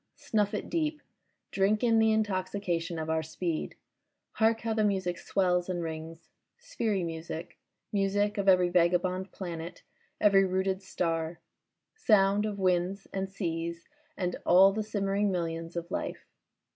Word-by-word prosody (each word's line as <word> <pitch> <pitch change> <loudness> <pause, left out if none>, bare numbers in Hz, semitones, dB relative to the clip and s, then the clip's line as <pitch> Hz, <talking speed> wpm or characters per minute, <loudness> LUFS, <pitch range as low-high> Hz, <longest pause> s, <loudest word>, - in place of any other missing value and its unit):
Snuff 210 -2 0
it - - -4
deep, 310 -2 -1 0.5
drink 200 +3 +2
in 230 -2 +4
the 220 0 +4
intoxication 185 -5 -1
of 160 0 -3
our 160 0 +1
speed. 160 +1 -3 0.6
Hark 225 0 +2
how 225 -1 -1
the 220 -1 +1
music 190 -4 0
swells 180 -2 +1
and 175 -2 -2
rings.... 160 0 -7 0.3
sphery 220 - -1
music, 165 +1 -6 0.3
music 205 +1 +1
of 200 - -1
every 180 -1 +5
vagabond 180 +2 +1
planet, 170 -1 -7 0.4
every 200 -2 +5
rooted 190 0 0
star; 165 -3 -2 0.5
sound 210 - +3
of 205 -1 -4
winds 185 +1 0
and 190 0 -2
seas 170 -3 -4 0.3
and 180 -1 -2
all 190 +3 +7
the 215 - -1
simmering 205 -1 0
millions 165 -1 -3
of 170 +1 -5
life. - - -4
185 Hz, 140 wpm, -29 LUFS, 170-205 Hz, 0.6 s, all